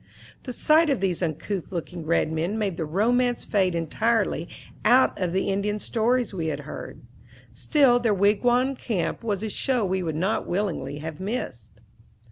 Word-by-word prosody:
The 255 - -4
sight 310 +5 +4
of 275 - +1
these 185 -2 -1
uncouth 170 +3 -3
looking 170 -2 -5
red 165 -1 +2
men 170 +7 -1
made 200 -5 -1
the 160 - -3
romance 240 +9 +1
fade 190 -4 +1
entirely 220 +8 0 0.3
out 255 +2 +5
of 180 -2 0
the 190 +2 0
Indian 200 +2 0
stories 235 +1 0
we 165 -4 -2
had 155 - -2
heard. - - -8 0.5
Still 270 -6 +3
their 235 -2 +1
wigwam 240 +7 +2
camp 220 -5 -3
was 210 -3 -2
a 220 - -2
show 245 +1 0
we 190 0 0
would 160 -3 -3
not 185 +7 -1
willingly 175 -7 -2
have 155 0 -7
missed. 130 - -5
200 Hz, 165 wpm, -25 LUFS, 170-235 Hz, 0.5 s, out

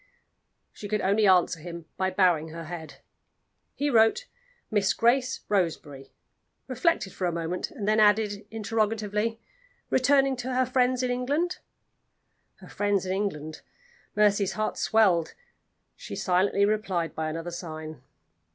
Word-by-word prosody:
She 205 - -8
could 210 0 -1
only 205 +2 +3
answer 180 -2 +4
him 170 0 -8
by 190 0 0
bowing 180 -4 +2
her 165 +1 -8
head. 160 -1 -9 0.7
He 290 - -1
wrote: 235 - +3 0.5
"Miss 200 -3 +2
Grace 250 +2 +2
Roseberry" 155 -8 -2 0.6
reflected 255 - 0
for 185 - -2
a - - 0
moment 170 +1 -3
and 230 -12 -6
then 215 +1 +3
added, 210 -1 +2
interrogatively, 220 0 -1 0.5
"Returning 270 +1 +3
to 250 +1 -4
her 255 0 +3
friends 255 0 +1
in 250 - 0
England?" 285 +9 -1 1.0
Her - - -15
friends 205 -2 0
in 185 - -3
England? 155 -6 -3 0.5
Mercy's 205 -2 +3
heart 215 0 -2
swelled: 190 -7 +2 0.6
she - - -8
silently 190 +2 +2
replied 195 -6 -1
by 160 0 -3
another 165 +2 -5
sign. 155 -4 -7
205 Hz, 135 wpm, -27 LUFS, 175-225 Hz, 1.0 s, answer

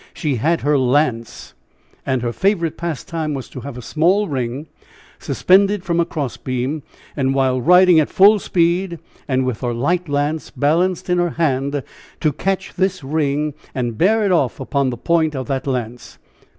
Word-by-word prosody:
She 145 -6 -1
had 165 +8 +1
her 145 -1 +2
lance. 125 -3 0 0.5
And, 130 -2 0
her 120 -1 -2
favorite 180 - 0
pastime 165 -2 -4
was 135 - -6
to - - -8
have 125 +1 -8
a 125 - -8
small 185 - +2
ring 130 0 -3 0.5
suspended 195 +1 +2
from 170 -2 -1
a 170 - +3
crossbeam, 135 -1 -3 0.3
and 135 -2 0
while 130 -2 +1
riding 180 +2 +6
at 155 - +1
full 205 +2 +6
speed, 175 0 0 0.3
with 130 -3 0
her 120 -2 -2
light 170 +7 -1
lance 145 +2 -1
balanced 170 +5 0
in 180 -1 +1
her 175 0 +1
hand, 140 -3 0 0.4
to 155 -3 +1
catch 190 +5 -2
this 185 -3 -1
ring 150 +1 -1 0.2
and 120 -4 -3
bear 215 +4 +3
it 195 - +1
off 140 -9 +1
upon 135 0 0
the 120 - -4
point 160 +1 +1
of 130 -1 -3
that 135 0 -2
lance. 125 -2 -4
150 Hz, 165 wpm, -19 LUFS, 130-175 Hz, 0.5 s, riding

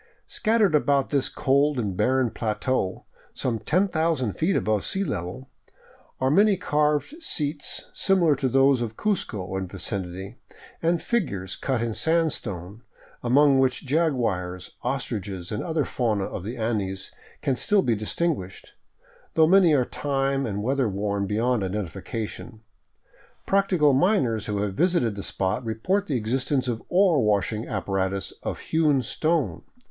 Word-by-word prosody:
Scattered 215 -5 +2
about 140 -2 +2
this 140 -3 +1
cold 140 +2 +2
and 105 -6 -2
barren 130 +3 +2
plateau, 110 -2 -2 0.3
some 120 -3 -1
10,000 160 - +1
feet 175 +4 0
above 105 +1 +1
sea 195 - -1
level, 105 - -4 0.7
are 130 +1 +2
many 200 +4 +5
carved 150 - 0
seats, 150 - -2
similar 175 -6 +3
to 135 -1 0
those 135 0 +4
of 110 -2 -4
Cuzco 105 - -2
and 95 -1 -4
vicinity, 95 +2 -4 0.4
and 170 +1 +2
figures 100 - -2
cut 130 -4 -1
in 115 -1 -2
sandstone, 115 - -1 0.4
among 135 +2 +4
which 130 0 +1
jaguars, 115 - -1
ostriches, 105 -8 -3
and 105 - -2
other 160 -3 -1
fauna 110 -5 0
of 90 - -5
the 115 +5 -5
Andes 105 -4 -2 0.3
can 135 - +1
still 205 - +2
be 120 - +2
distinguished, 110 - -3 0.6
though 160 - +6
many 180 0 +5
are 130 -3 +2
time 135 -1 -1
and 105 -1 -3
weather 130 -1 +1
worn 100 0 -1
beyond 115 +3 +1
identification. 105 +4 -5 0.8
Practical 185 -7 +3
miners 130 - +2
who 105 -1 -1
have 100 -2 -2
visited 170 - +2
the 100 - -6
spot 95 +6 -2
report 185 - -1
the 140 - 0
existence 130 +4 -1
of 115 -2 -2
ore 180 - +4
washing 105 +2 0
apparatus 95 -1 -2
of - - -3
hewn 150 -5 +1
stone. 155 - 0
125 Hz, 140 wpm, -25 LUFS, 105-150 Hz, 0.8 s, though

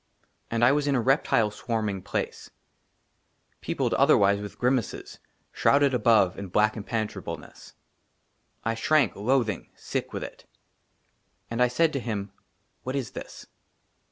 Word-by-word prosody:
AND 115 +1 +2
I 125 - +6
WAS 145 0 +1
IN 140 - +2
A - - +2
REPTILE 115 -4 +2
SWARMING 105 -3 -2
PLACE, - - -4 1.1
PEOPLED, - - -1
OTHERWISE, 100 0 +4
WITH 105 -1 -8
GRIMACES, 125 -2 -1 0.3
SHROUDED 140 -1 +3
ABOVE 105 -6 +3
IN 100 - -5
BLACK 105 +4 +2
IMPENETRABLENESS. 110 0 -5 0.9
I 115 - +1
SHRANK, 150 +6 +2
LOATHING, 110 -2 0
SICK - - -4
WITH - - -4
IT. - - -10 1.1
AND 115 +1 -1
I 125 - +6
SAID 155 +6 +2
TO 140 - -1
HIM, 105 -5 -4 0.2
" - - -45
WHAT 130 +1 -3
IS 130 -6 -3
THIS - - -9
115 Hz, 135 wpm, -26 LUFS, 105-130 Hz, 1.1 s, I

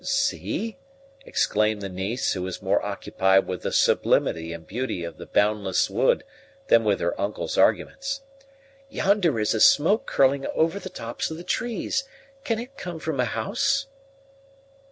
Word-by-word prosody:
"See!" 225 +2 -1 0.5
exclaimed 105 -1 +1
the - - -2
niece, 95 +6 -2
who 95 - -4
was 95 0 -4
more - - +1
occupied 95 0 +1
with 90 -2 -4
the - - -3
sublimity 80 0 +2
and 85 -1 -8
beauty 120 -4 -3
of 85 - -7
the - - -9
"boundless 105 -2 +1
wood" - - +2 0.5
than 115 - +6
with 105 -2 +1
her 85 - -1
uncle's 100 +1 -2
arguments; 275 0 +1 0.7
"yonder 195 - +2
is 105 - +1
a 110 - -1
smoke 170 +10 +5
curling 135 0 +2
over 165 +5 +1
the 185 - -7
tops 115 -8 -4
of 160 - -6
the 170 - -8
trees 240 +6 -1 0.4
can 230 -6 0
it 250 +4 -8
come 175 -8 -6
from 155 -3 -3
a 125 - +3
house?" 275 - 0
130 Hz, 155 wpm, -25 LUFS, -, 0.7 s, than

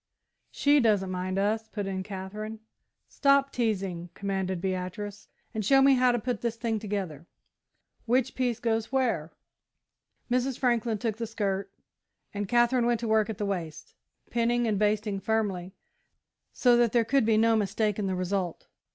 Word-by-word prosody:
"She 290 0 +3
doesn't 205 -6 +2
mind 185 +1 -2
us," 215 +3 0
put 205 -3 -4
in 190 -1 -3
Katherine. 210 +3 -6 0.5
"Stop 275 -1 +3
teasing," 195 -7 -2
commanded 190 -2 -2
Beatrice, 190 +3 -4 0.3
"and 220 -2 -2
show 270 +7 +5
me 270 0 +6
how 255 -1 +4
to 240 - +1
put 240 -2 -3
the 235 - +1
thing 230 -1 -2
together. 190 -7 -4 0.8
Which 255 +2 +2
piece 245 -3 -1
goes 225 -1 -1
where?" 235 - 0 1.0
Mrs. 255 +1 +1
Franklin 235 -3 +1
took 220 0 -2
the 230 0 -3
skirt 200 -3 -2 0.6
and 205 -1 -3
Katherine 240 0 +3
went 240 -2 +2
to 235 - -2
work 220 -1 +2
at 220 - -4
the 205 - -2
waist, 170 -6 -5 0.4
pinning 240 0 +1
and 210 -3 0
basting 210 -1 +1
firmly, 195 -4 -1 0.8
so 245 -2 +4
that 240 -2 +3
there 235 -2 +3
could 275 +3 +3
be 220 0 +3
no 225 +1 +4
mistake 210 0 0
in 200 - -1
the 190 - -1
result. 185 -1 -2
215 Hz, 160 wpm, -28 LUFS, 195-235 Hz, 1.0 s, me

